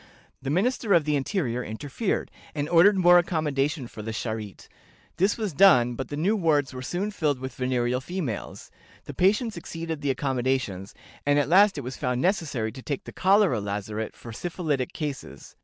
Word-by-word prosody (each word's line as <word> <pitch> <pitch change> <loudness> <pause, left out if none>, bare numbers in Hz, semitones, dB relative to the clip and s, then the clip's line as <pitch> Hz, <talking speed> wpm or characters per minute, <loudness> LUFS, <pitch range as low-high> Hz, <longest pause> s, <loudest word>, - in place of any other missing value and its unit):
The 135 - -4
Minister 205 - +2
of 165 - +4
the 150 -1 +1
Interior 135 - -1
interfered, 145 - -3 0.2
and 145 -1 -1
ordered 175 +5 +5
more 175 -1 +7
accommodation 150 -4 -1
for 110 - -9
the 110 - -6
Charité. 110 -2 -5 0.5
This 195 +3 +2
was 215 -6 -3
done, 135 -9 +6
but 130 +1 -5
the 145 - -5
new 190 +8 +2
wards 155 -9 +1
were 130 - -6
soon 180 +10 -3
filled 150 -8 0
with 130 0 -6
venereal 125 0 0
females; 155 - -5 0.3
the - - -8
patients 210 +3 +1
exceeded 165 -2 -5
the 145 - -1
accommodations, 130 -7 -1 0.3
and 145 0 +2
at 145 0 +1
last 195 +1 +5
it - - -2
was 130 0 -6
found 125 -1 -1
necessary 145 - 0
to 130 - -10
take 140 +1 -4
the - - -9
Cholera 190 - +3
Lazaret 105 +2 -4
for 115 - -10
syphilitic 155 -2 -2
cases. 135 - -6
145 Hz, 175 wpm, -26 LUFS, 125-175 Hz, 0.5 s, more